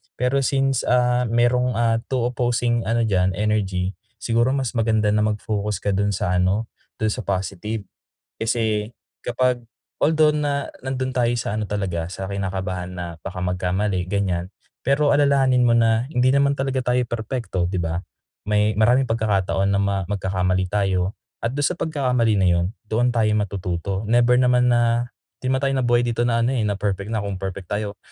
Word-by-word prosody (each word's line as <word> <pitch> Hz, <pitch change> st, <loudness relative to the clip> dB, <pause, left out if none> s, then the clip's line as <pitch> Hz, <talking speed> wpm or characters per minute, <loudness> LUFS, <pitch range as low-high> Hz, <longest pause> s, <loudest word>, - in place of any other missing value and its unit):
Pero 125 Hz, +2 st, +1 dB
since, 135 Hz, -1 st, +1 dB
ah, 125 Hz, 0 st, +3 dB
merong, 120 Hz, +2 st, +2 dB
ah, 115 Hz, 0 st, +2 dB
2 125 Hz, -2 st, 0 dB
opposing 120 Hz, -1 st, 0 dB
ano 115 Hz, +1 st, +1 dB
diyan, 95 Hz, -3 st, +1 dB
energy, 100 Hz, -2 st, -1 dB, 0.2 s
siguro 120 Hz, +3 st, +2 dB
mas 130 Hz, -4 st, -1 dB
maganda 110 Hz, -2 st, +2 dB
na 105 Hz, 0 st, +2 dB
mag-focus 105 Hz, -1 st, -2 dB
ka -, -, 0 dB
dun 100 Hz, +1 st, +1 dB
sa 90 Hz, -1 st, 0 dB
ano, 95 Hz, +5 st, +1 dB, 0.3 s
dun 110 Hz, -, +2 dB
sa 125 Hz, +1 st, -4 dB
positive. 100 Hz, +3 st, -3 dB, 0.5 s
Kasi 110 Hz, -2 st, -1 dB, 0.3 s
kapag 125 Hz, 0 st, 0 dB, 0.4 s
although 155 Hz, -1 st, +4 dB
na 145 Hz, -2 st, -1 dB, 0.2 s
nandun 130 Hz, 0 st, -2 dB
tayo 120 Hz, -2 st, +2 dB
sa 110 Hz, -, -3 dB
ano 110 Hz, -2 st, -3 dB
talaga, 90 Hz, -5 st, -2 dB
sa 95 Hz, 0 st, -5 dB
kinakabahan 95 Hz, -2 st, -3 dB
na 90 Hz, -1 st, -5 dB, 0.2 s
baka 90 Hz, -1 st, -6 dB
magkamali, 90 Hz, +1 st, -1 dB
ganiyan. 95 Hz, -3 st, -1 dB, 0.4 s
Pero 140 Hz, +2 st, +3 dB
alalahanin 135 Hz, -4 st, +3 dB
mo 120 Hz, -, +4 dB
na 115 Hz, 0 st, +3 dB
hindi 125 Hz, +1 st, +3 dB
naman 140 Hz, +1 st, +3 dB
talaga 135 Hz, -1 st, -2 dB, 0.2 s
tayo 125 Hz, -, +3 dB
perpekto, 110 Hz, -5 st, -2 dB
di 90 Hz, 0 st, -1 dB
ba? 80 Hz, 0 st, -2 dB, 0.5 s
May 105 Hz, 0 st, +1 dB
maraming 125 Hz, +4 st, +3 dB
pagkakataon 100 Hz, -3 st, +1 dB
na 100 Hz, -, +2 dB
ma 100 Hz, 0 st, 0 dB
magkakamali 95 Hz, -1 st, -1 dB
tayo 95 Hz, -1 st, 0 dB, 0.2 s
at 115 Hz, -, 0 dB
dun 145 Hz, -, +2 dB
sa -, -, +1 dB
pagkakamali 125 Hz, -, +1 dB
na 95 Hz, -, +3 dB
yun 85 Hz, -1 st, +3 dB, 0.2 s
doon 115 Hz, +3 st, +1 dB
tayo 110 Hz, -3 st, +2 dB
matututo. 95 Hz, -1 st, -2 dB
Never 120 Hz, +2 st, +4 dB
naman 125 Hz, -1 st, +4 dB
na 120 Hz, 0 st, +2 dB, 0.3 s
di 130 Hz, -, -2 dB
naman 130 Hz, 0 st, +1 dB
tayo 135 Hz, -, +1 dB
nabuhay 120 Hz, -2 st, +2 dB
dito 120 Hz, 0 st, -1 dB
na 115 Hz, -1 st, +2 dB
ano, 130 Hz, -, +1 dB
eh, 125 Hz, -, 0 dB
na 105 Hz, -2 st, -1 dB
perfect 100 Hz, 0 st, -2 dB
na. 110 Hz, -, -1 dB
Kung 100 Hz, -2 st, -5 dB
perfect 95 Hz, 0 st, -5 dB
tayo 105 Hz, -1 st, -3 dB
110 Hz, 175 wpm, -22 LUFS, 95-125 Hz, 0.5 s, although